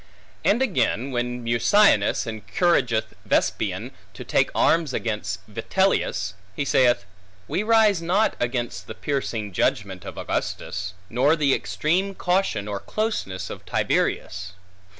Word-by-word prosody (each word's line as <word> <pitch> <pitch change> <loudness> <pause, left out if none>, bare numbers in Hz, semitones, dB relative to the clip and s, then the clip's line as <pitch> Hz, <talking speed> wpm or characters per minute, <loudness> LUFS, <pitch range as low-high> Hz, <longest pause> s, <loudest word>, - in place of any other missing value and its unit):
And 235 +6 +3
again, 140 - 0
when 120 0 -2
Mucianus 120 - +4
encourageth 115 - 0
Vespasian, - - 0 0.2
to - - -7
take - - +2
arms 160 -5 +3
against 105 -4 -3
Vitellius, 110 - 0 0.2
he 140 - -1
saith, 120 -6 +3 0.4
We - - 0
rise 215 -4 +4
not 190 +6 +2
against 120 -6 -2
the - - -7
piercing 115 -8 -3
judgment 95 -2 0
of - - -8
Augustus, 95 0 -3
nor 130 +9 +3
the 145 -4 +2
extreme 190 +5 0
caution 180 - 0
or 100 -1 -3
closeness 95 - -3
of - - -8
Tiberius. 95 -1 -1
125 Hz, 120 wpm, -24 LUFS, -, 0.4 s, Mucianus